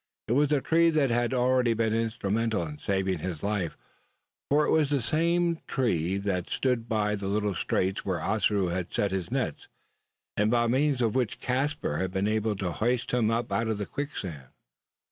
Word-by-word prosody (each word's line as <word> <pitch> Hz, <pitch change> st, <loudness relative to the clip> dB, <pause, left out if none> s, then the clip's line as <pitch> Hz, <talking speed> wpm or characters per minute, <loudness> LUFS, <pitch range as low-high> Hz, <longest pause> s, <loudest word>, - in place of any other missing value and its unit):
It -, -, -3 dB
was 145 Hz, +4 st, +3 dB
a 145 Hz, -2 st, +3 dB
tree 165 Hz, +3 st, +4 dB
that 150 Hz, -5 st, +2 dB
had 120 Hz, 0 st, +1 dB
already 125 Hz, -2 st, +2 dB
been 110 Hz, -1 st, +1 dB
instrumental 110 Hz, -3 st, 0 dB
in 75 Hz, -1 st, -8 dB
saving 95 Hz, -2 st, 0 dB
his 85 Hz, -1 st, -5 dB
life: 100 Hz, -5 st, -1 dB, 0.7 s
for 150 Hz, +1 st, +4 dB
it -, -, +1 dB
was 155 Hz, -3 st, +3 dB
the 145 Hz, -1 st, +2 dB
same 170 Hz, +5 st, +1 dB
that 95 Hz, -4 st, 0 dB
stood 125 Hz, -3 st, 0 dB
by 105 Hz, -2 st, +1 dB
the 100 Hz, -2 st, -3 dB
little 105 Hz, 0 st, 0 dB
straits 95 Hz, +2 st, -1 dB
where 95 Hz, -3 st, -1 dB
Ossaroo 100 Hz, 0 st, +1 dB
had 90 Hz, 0 st, -3 dB
set 100 Hz, -, 0 dB
his 95 Hz, -2 st, -2 dB
nets, 125 Hz, -, -2 dB, 0.7 s
and 105 Hz, +1 st, +2 dB
by 120 Hz, 0 st, +3 dB
means 130 Hz, +2 st, +2 dB
of 115 Hz, -, +1 dB
which 125 Hz, -4 st, -1 dB
Caspar 135 Hz, -, -1 dB
had 95 Hz, -, -1 dB
been 95 Hz, 0 st, 0 dB
enabled 110 Hz, -1 st, 0 dB
to 90 Hz, -2 st, -1 dB
hoist 120 Hz, +5 st, 0 dB
him 120 Hz, -3 st, +2 dB
up 115 Hz, +1 st, -1 dB
out 115 Hz, -, 0 dB
of 110 Hz, -2 st, -1 dB
the 105 Hz, -, -3 dB
quicksand. 95 Hz, -, -5 dB
110 Hz, 185 wpm, -28 LUFS, 95-130 Hz, 0.7 s, tree